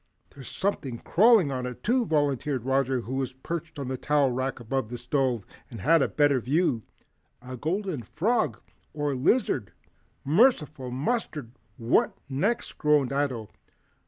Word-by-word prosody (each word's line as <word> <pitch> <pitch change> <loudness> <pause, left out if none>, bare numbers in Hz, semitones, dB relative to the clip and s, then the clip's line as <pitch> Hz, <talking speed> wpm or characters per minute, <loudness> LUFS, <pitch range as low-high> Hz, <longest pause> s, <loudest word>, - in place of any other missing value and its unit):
"There's 135 -3 -11
something 140 -11 -2
crawling 205 - +4
on 130 -1 -3
it, 125 - -8
too," 240 +1 +2
volunteered 145 -4 0
Roger, 135 -1 +1
who 130 +3 -4
was 130 -1 -2
perched 160 +4 -6
on 140 -2 -4
the 130 -1 -3
towel 145 -3 +2
rack 130 +1 -2
above 120 0 -2
the 120 - -5
stove, 125 -2 0 0.2
and 115 - -8
had 165 - +4
a - - +3
better 145 -3 +3
view, 130 0 +1 0.6
"a 130 +1 -8
golden 170 - -2
frog 155 - 0 0.4
or 145 -1 -1
a - - -2
lizard." 130 - +1 0.5
"Merciful 155 - +3
mustard! 145 - -2 0.3
What 115 0 +2
next?" 185 - -1
groaned 150 -3 +3
Ato. 130 -7 -2
135 Hz, 150 wpm, -27 LUFS, 125-160 Hz, 0.6 s, crawling